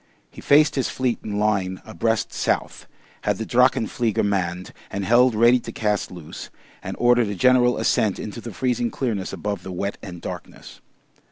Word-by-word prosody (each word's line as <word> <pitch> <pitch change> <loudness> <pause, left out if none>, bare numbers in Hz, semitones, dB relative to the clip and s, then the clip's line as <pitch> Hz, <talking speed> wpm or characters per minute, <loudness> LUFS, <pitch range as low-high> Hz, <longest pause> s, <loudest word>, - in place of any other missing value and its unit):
He - - -11
faced 150 +2 +5
his 135 - -1
fleet 125 -3 -1
in 105 -1 -4
line 100 -3 0
abreast 115 +6 -1
south, - - -2 0.3
had - - 0
the 110 - -4
drachenflieger 120 -3 +2
manned 90 -3 -2 0.2
and 100 0 -3
held 120 +1 +4
ready 120 +3 +5
to - - -8
cast 105 -2 -1
loose, 85 -4 -9 0.3
and - - -6
ordered 120 -1 +4
a 100 - -3
general 125 +3 +4
ascent 110 -2 +1
into 110 +2 -6
the 115 - -7
freezing 120 +1 -1
clearness 110 -6 -3
above 100 +1 -4
the 95 - -8
wet 100 +3 -3
and 90 -3 -8
darkness. - - -9
110 Hz, 170 wpm, -23 LUFS, 100-120 Hz, 0.3 s, faced